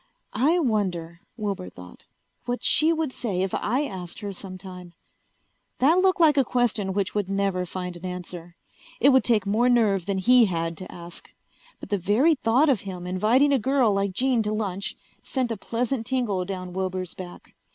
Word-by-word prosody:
I 290 +10 +3
wonder, 185 - -1 0.2
Wilbur 200 - -3
thought, 90 0 -14 0.4
what 245 0 -3
she 315 +2 +4
would 320 -5 -1
say 190 -6 -2
if 190 - -3
I 250 +7 0
asked 185 -10 -6
her 200 -1 -5
sometime? 185 -2 -9 0.8
That 315 +8 +4
looked 375 0 +3
like 310 -4 +5
a 275 - +5
question 230 -6 0
which 200 -1 -1
would 205 -2 -1
never 195 -2 -1
find 180 0 -5
an 175 - -12
answer. 180 -1 -7 0.4
It 275 - +6
would 265 -1 +5
take 220 -5 +2
more 220 +5 +2
nerve 205 -7 +2
than 200 -1 0
he 240 +5 +5
had 165 -3 -2
to 185 - -9
ask. 170 0 -10 0.5
But - - -10
the 205 -2 0
very 220 - +3
thought 260 +2 +2
of 260 -8 +2
him 185 -2 -7
inviting 220 +10 +3
a 270 - +3
girl 255 -2 +2
like 195 -1 0
Jean 255 +2 +2
to 210 -1 -2
lunch 200 -3 -3 0.2
sent 255 -3 -2
a - - -1
pleasant 230 +2 -2
tingle 235 -8 0
down 185 -1 -6
Wilbur's 185 -1 -3
back. 180 -1 -11
205 Hz, 185 wpm, -25 LUFS, 185-250 Hz, 0.8 s, It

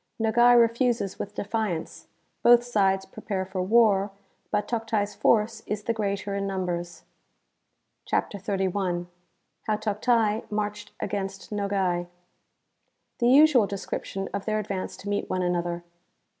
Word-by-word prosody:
Nogai 240 +2 +5
refuses 235 -3 +2
with 205 - -5
defiance. 205 -5 -3 0.3
Both 240 0 +6
sides 195 -5 +1
prepare 190 -1 -4
for 190 0 -3
war, 205 -1 +4 0.4
but 205 - 0
Toctai's 220 -3 -1
force 215 +2 +2
is 210 0 -3
the 230 - 0
greater 200 -2 -2
in 200 0 -2
numbers.) 175 -3 -3 1.0
CHAPTER 200 - -1
XXXI. 190 -2 -1 0.6
How 215 -1 +1
Toctai 215 +1 +1
marched 210 0 -3
against 195 0 -4
Nogai. 195 -4 0 1.1
•^(The 240 0 +4
usual 275 -6 +6
description 195 0 -4
of 200 - -3
their 215 -1 0
advance 200 -3 -4
to 205 - -10
meet 205 0 -1
one 185 0 0
an 175 0 +1
other. 175 0 -3
205 Hz, 130 wpm, -26 LUFS, 190-220 Hz, 1.1 s, Both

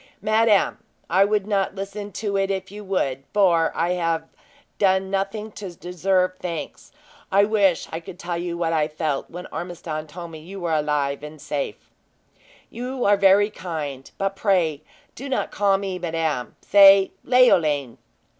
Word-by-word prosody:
"Madame, 215 -1 +3 0.3
I 190 +3 +5
would 205 -1 +1
not 200 -2 0
listen 200 +1 -6
to 220 - -6
you 200 - 0
if 195 -1 -1
you 210 +1 -8
would; 140 -9 -1
for 175 -5 +4
I 170 +2 0
have 165 -2 0 0.6
done 190 -1 +2
nothing 200 +2 -2
to 195 -4 -8
deserve 185 +2 0
thanks. 170 -3 -6 0.4
I 200 +1 +5
wish 200 -5 +2
I 165 - -3
could 170 +1 -11
tell 175 -1 -4
you 175 -1 -3
what 165 -1 0
I 155 -2 +2
felt 155 -2 -3
when 180 +1 -8
Ormiston 165 -3 -5
told 170 +2 -9
me 160 - -9
you 190 +5 -9
were 170 -2 -1
alive 150 -2 0
and 150 +1 -9
safe." 140 -6 -5 0.8
"You 250 +2 -4
are 205 - +5
very 200 +1 +4
kind, 150 -9 -6
but 195 0 -1
pray 175 -8 +1 0.3
do 275 +3 -8
not 265 - -1
call 200 -1 +2
me 195 -2 -4
madame. 160 -7 -2
Say 195 -1 +7
Leoline!" 155 - +3
185 Hz, 160 wpm, -23 LUFS, 160-200 Hz, 0.8 s, Say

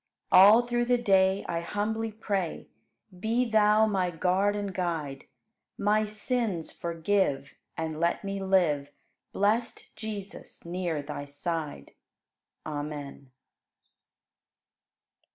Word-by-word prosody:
All 205 +6 +8
through 240 0 0
the 245 0 +3
day, 195 -4 +3
I 170 - -1
humbly 215 +5 -2
pray, 200 -5 -3 0.5
Be 230 +5 +1
Thou 215 -1 +4
my 190 -4 0
Guard 185 +4 +1
and 200 -2 -3
Guide; 160 -7 -3 0.5
My 210 +1 +2
sins 215 -4 -1
forgive 165 -4 -1 0.2
And 160 -1 -3
let 170 +4 +1
me 195 0 -3
live, 170 -7 +2 0.4
Blest 220 +4 -1
Jesus, 215 -5 -7
near 170 -3 -2
Thy 145 0 -6
side. 145 - -4 0.7
Amen. 145 -2 -6
190 Hz, 100 wpm, -28 LUFS, 165-215 Hz, 0.7 s, All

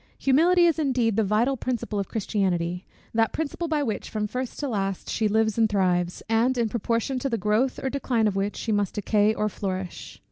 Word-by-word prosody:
Humility 345 +6 +4
is 330 -2 +2
indeed 250 -7 +1
the 220 - +2
vital 220 +7 +2
principle 235 -4 -3
of 195 - -2
Christianity; 180 -5 -1 0.3
that 225 0 +2
principle 320 +2 -3
by 305 -2 0
which 220 -6 -3
from 215 -1 -2
first 250 +4 -4
to 290 - -2
last 195 -5 -2
she 220 - +1
lives 220 +1 +1
and 220 -1 +4
thrives, 180 -3 0
and 230 +3 +2
in 230 -2 +1
proportion 235 +3 -1
to 275 - -2
the 230 - 0
growth 215 +6 +1
or - - 0
decline 250 -5 0
of 205 -2 +1
which 195 +1 -1
she 225 - -3
must 205 -2 0
decay 210 +1 +2
or 215 -1 -1
flourish. 190 -3 -5
220 Hz, 205 wpm, -25 LUFS, 205-255 Hz, 0.3 s, Humility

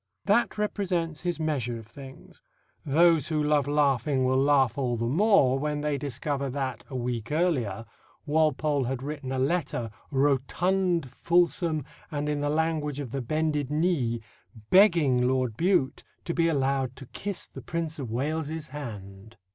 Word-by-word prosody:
That 235 -2 +2
represents 180 -6 -1
his 175 -2 -2
measure 135 -7 -1
of 115 - -10
things. 135 +3 -13 0.4
Those 160 +1 +4
who 155 -2 0
love 150 -1 +2
laughing 140 -2 +2
will 130 +1 +2
laugh 135 -4 +3
all 125 -4 -1
the 115 - -1
more 145 - +4
when 150 0 -2
they 150 -2 -1
discover 140 +1 -2
that, 130 -5 -3
a 130 - -7
week 120 -2 -3
earlier, 130 - 0 0.4
Walpole 150 -2 +1
had 130 +1 -3
written 140 -2 -5
a 135 - -1
letter, 135 -5 -1 0.2
rotund, 155 +4 +1
fulsome, 170 -1 +1 0.2
and 150 -2 -3
in 150 -1 -1
the 145 - 0
language 155 -2 0
of 135 -5 -5
the 135 - -2
bended 150 +1 -1
knee, 150 -7 0 0.5
begging 170 -10 +5
Lord 130 -3 0
Bute 150 - +1 0.2
to 170 - -2
be 165 -1 +2
allowed 135 -4 0
to 135 - -10
kiss 200 +9 -5
the - - -11
Prince 165 -2 -4
of 130 -5 -4
Wales's 155 +5 -3
hand. 110 -6 -9
145 Hz, 155 wpm, -27 LUFS, 130-160 Hz, 0.5 s, begging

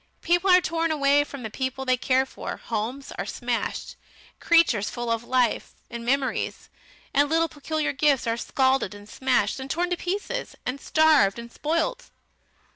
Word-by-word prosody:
People 350 +3 +2
are 365 0 +7
torn 330 -1 -1
away 290 -1 +3
from 280 -3 -9
the 220 - -5
people 260 +1 -3
they 255 -1 +3
care 260 +1 +2
for; - - -7
homes 235 +5 -4
are - - -2
smashed, - - -3 0.4
creatures 330 -12 +3
full 240 -1 -3
of 230 0 -1
life, 250 -1 0 0.2
and 235 -1 -6
memories, 265 +2 -1 0.4
and 285 +1 +3
little 330 +1 +2
peculiar 310 0 -2
gifts 280 -2 +2
are 230 0 0
scalded 260 -3 +1
and 205 0 -12
smashed, 255 -2 0
and 265 +1 -7
torn 350 +4 -1
to 355 - +1
pieces, 410 +8 -3
and 265 +3 -3
starved, 310 -11 +4
and 235 0 -8
spoilt. 335 - -2
275 Hz, 165 wpm, -25 LUFS, 240-320 Hz, 0.4 s, are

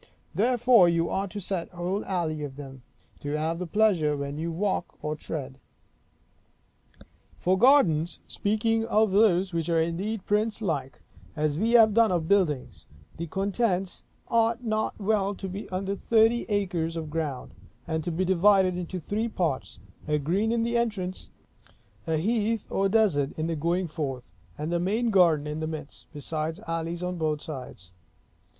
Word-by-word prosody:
Therefore 235 -1 +5
you 170 0 +1
are 195 +1 -1
to 205 +2 -6
set 185 -3 -3
whole 180 +3 -3
alleys 160 -5 -2
of 140 -2 -6
them, 135 -2 -10 0.4
to 145 +1 -3
have 160 +2 -1
the 180 - -4
pleasure 170 -7 +2
when 140 +1 -4
you 165 +1 -2
walk 185 +1 -2
or 150 0 -2
tread. 140 -3 -6 1.8
For 185 +1 +2
gardens 190 - +4
(speaking 225 +2 0
of 215 -2 +2
those 190 -3 +3
which 165 0 -1
are 165 -1 +3
indeed 185 +6 -2
princelike, 205 - -1 0.3
as 150 -1 0
we 225 +3 +1
have 220 -3 +7
done 230 -1 +4
of 170 -3 0
buildings), 145 - 0 0.3
the 170 +1 -4
contents 195 +1 -1 0.3
ought 230 +1 +2
not 220 -1 -1
well 205 -1 +1
to 195 - -6
be 195 +3 -6
under 195 +2 -2
thirty 225 +3 +3
acres 180 -5 -1
of 155 -2 -5
ground; 150 -5 -3 0.3
and 160 -1 -1
to 175 - -2
be 180 +3 0
divided 190 0 +4
into 180 +1 -4
three 210 +7 -2
parts; 170 - -2 0.3
a 150 0 +2
green 185 +10 0
in 230 -1 +1
the 235 +1 0
entrance; 205 -6 -2 0.8
a 160 -1 +1
heath 220 +4 0
or 195 0 +1
desert 185 -11 +2
in 155 - -1
the 165 0 -1
going 170 +4 0
forth; 135 - -5 0.2
and 150 +3 -3
the 175 - +1
main 220 +6 0
garden 170 -7 +4
in 150 +1 -4
the 155 - -2
midst; 155 -2 -8
besides 155 +1 -3
alleys 165 +1 -3
on 180 -1 -3
both 155 -2 -1
sides. 125 - -8
180 Hz, 160 wpm, -27 LUFS, 155-210 Hz, 1.8 s, have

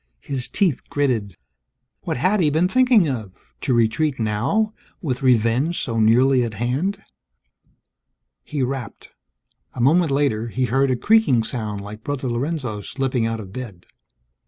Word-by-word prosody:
His 130 -3 -4
teeth 180 -10 +1
gritted. 115 - -1 0.7
What - - -2
had 185 +11 +2
he 160 -4 +3
been 160 +5 +2
thinking 250 -4 +4
of 110 -9 -4 0.3
to - - -1
retreat 120 +5 +1
now, 125 - 0 0.3
with 130 -7 -3
revenge 125 +6 +2
so 115 -3 -2
nearly 125 +4 +4
at 115 -2 -4
hand! 155 - -2 1.4
He 145 -4 -2
rapped. 130 -4 -5 0.6
A - - -7
moment 160 +7 +4
later, 135 -6 0
he 125 +3 -1
heard 135 +2 +1
a 130 - +2
creaking 170 - +3
sound 110 -4 -4
like 105 +2 -9
Brother 145 -2 -3
Lorenzo 120 -3 -3
slipping 125 0 -1
out 115 0 -3
of 95 -3 -9
bed. 105 -8 -8
130 Hz, 145 wpm, -22 LUFS, 115-150 Hz, 1.4 s, thinking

